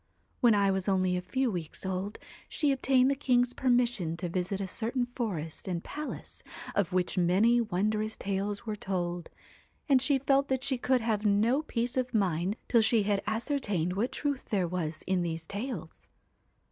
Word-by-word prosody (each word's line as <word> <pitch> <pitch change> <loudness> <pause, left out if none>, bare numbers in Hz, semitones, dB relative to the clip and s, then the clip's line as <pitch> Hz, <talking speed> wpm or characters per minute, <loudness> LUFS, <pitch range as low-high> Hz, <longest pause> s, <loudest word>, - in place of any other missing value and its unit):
1 240 -3 +5
When - - +4
I 200 -1 +3
was 190 0 -1
only 185 -1 +2
a 180 - -1
few 260 +6 0
weeks 175 -1 -5
old, 190 +3 -3 0.3
she 295 -3 +1
obtained 265 0 +3
the - - +1
king's 250 -3 +2
permission 240 -11 +1
to 175 0 -3
visit 185 +2 -2
a 195 - -2
certain 235 +6 -1
forest 200 - -4
and 175 -2 -2
palace, 300 0 -7 0.3
of 200 -4 +1
which 185 +1 0
many 205 +8 +4
wondrous 215 +1 -1
tales 200 +2 -2
were 215 -2 -2
told, 175 -4 -3 0.6
and 270 -3 +5
she 275 +1 +3
felt 275 +1 +2
that 260 -1 -1
she 265 -2 0
could 255 0 +2
have 220 -2 0
no 220 +7 +3
peace 245 -3 -2
of 255 -1 -1
mind 185 -1 +1
till 235 - +4
she 220 -1 +3
had 200 -1 +1
ascertained 220 - -1
what 215 +7 -1
truth 285 -2 -2
there 190 -4 0
was 165 -3 -3
in 185 -1 +1
these 165 -1 -3
tales. 230 +9 -6
210 Hz, 180 wpm, -30 LUFS, 185-250 Hz, 0.6 s, 1